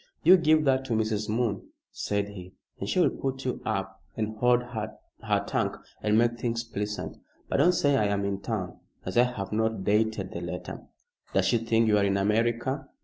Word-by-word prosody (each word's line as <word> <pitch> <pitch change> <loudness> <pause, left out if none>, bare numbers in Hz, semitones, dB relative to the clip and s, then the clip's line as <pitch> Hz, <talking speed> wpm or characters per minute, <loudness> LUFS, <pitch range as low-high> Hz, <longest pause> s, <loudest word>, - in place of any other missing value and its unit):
"You 180 +4 +9
give 155 -3 +4
that 135 -1 +3
to 120 - -2
Mrs. 110 -1 0
Moon," 110 -3 0 0.3
said 100 0 -2
he, 95 -2 -10 0.2
"and - - -4
she - - +1
will - - +4
put 135 0 -4
you 125 - -2
up 95 -3 -3 0.2
and 110 0 -2
hold 125 +1 +3
her 110 -3 -6 0.5
tongue - - -1 0.2
and 105 0 +2
make 120 +1 +2
things 115 -1 -1
pleasant. 105 -2 -4 0.3
But - - +1
don't 180 - +5
say 145 -5 +3
I 110 - +3
am 100 0 0
in 100 -1 -2
town, 100 -6 -4 0.3
as 95 - -4
I 120 - +6
have 100 -6 -5
not 110 -2 0
dated 105 -1 +1
the 85 - -5
letter." 85 - -6 0.5
"Does - - +3
she 120 - +3
think 115 0 +2
you 105 -1 +4
are - - +2
in 100 0 +2
America?" 120 +7 0
110 Hz, 200 wpm, -27 LUFS, 100-120 Hz, 0.5 s, You